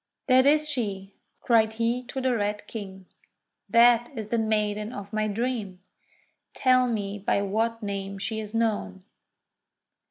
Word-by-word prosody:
'That 260 0 +5
is 305 +1 +4
she," 205 -8 -3 0.3
cried 220 -2 +3
he 230 +2 0
to 255 +2 -6
the 260 -1 +1
Red 205 -1 -2
King, 190 -4 -8 0.6
"that 235 0 +5
is 215 -1 -5
the 235 - +1
maiden 210 0 -1
of 200 -2 -8
my 215 0 0
dream! 215 -3 -3 0.8
Tell 255 -1 +4
me 205 -3 -3
by 200 0 0
what 225 +3 -1
name 195 -1 -4
she 220 +3 -3
is 215 0 -7
known." 205 - -1
220 Hz, 145 wpm, -26 LUFS, 200-235 Hz, 0.8 s, That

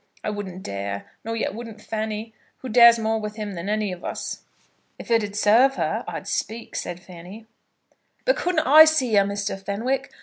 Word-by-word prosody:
I - - -2
wouldn't 190 -3 -6
dare; 100 0 -5
nor 225 +1 -3
yet 225 - -2
wouldn't 225 -1 -8
Fanny, 220 +1 -4 0.2
who 260 - -8
dares 235 0 +8
more 220 0 0
with 210 0 -5
him 210 -2 -5
than 175 +2 -5
any 210 -2 0
of 180 -1 -8
us." - - -5 0.6
"If - - -9
it'd 210 -3 +1
serve 235 +6 +4
her, - - -1
I'd - - -6
speak," 230 +1 -4
said 175 0 -4
Fanny. 180 +5 -12 0.8
"But - - +3
couldn't 350 -3 0
I 310 +3 +9
see 275 -7 +1
her, 200 -1 +6
Mr. 200 -1 -4
Fenwick? 255 +8 -2
215 Hz, 180 wpm, -23 LUFS, 200-235 Hz, 0.8 s, I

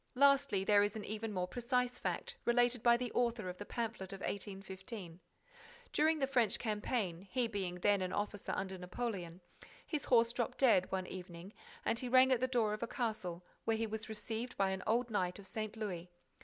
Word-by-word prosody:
Lastly, 275 -7 +4
there 205 +1 +5
is 205 +1 +1
an 215 - -5
even 215 +1 -3
more 180 -2 -1
precise 250 +3 0
fact 480 0 -2
related 245 0 +3
by 235 0 +6
the 245 -1 -3
author 235 -5 0
of 180 - -7
the 205 - -6
pamphlet 225 -5 -3
of 195 -1 -7
1815. 195 -2 -6 0.7
During 315 +1 +4
the 275 - +2
French 245 -6 +2
campaign, 210 -5 -2
he 245 +2 +1
being 195 -5 -3
then 200 +2 +3
an 185 0 -1
officer 205 0 -2
under 190 -1 -3
Napoleon, 180 -2 -4 0.4
his 300 -4 -2
horse 235 -1 +4
dropped 240 -1 -2
dead, 225 -9 +4
one 190 -1 -1
evening, 180 +1 -8 0.3
and 230 - +1
he 250 - -3
rang 260 +1 +7
at 255 - +4
the 255 - +2
door 235 -5 +2
of 215 - -4
a 235 - -1
castle 215 -9 -3 0.2
where 225 -1 +2
he 225 - 0
was 220 0 -5
received 220 +3 -4
by 195 -1 +2
an 190 0 -2
old 235 +2 +2
knight 180 -4 0
of 200 - -10
St. 215 +2 -4
Louis. 180 -5 -4
215 Hz, 195 wpm, -36 LUFS, 190-240 Hz, 0.7 s, rang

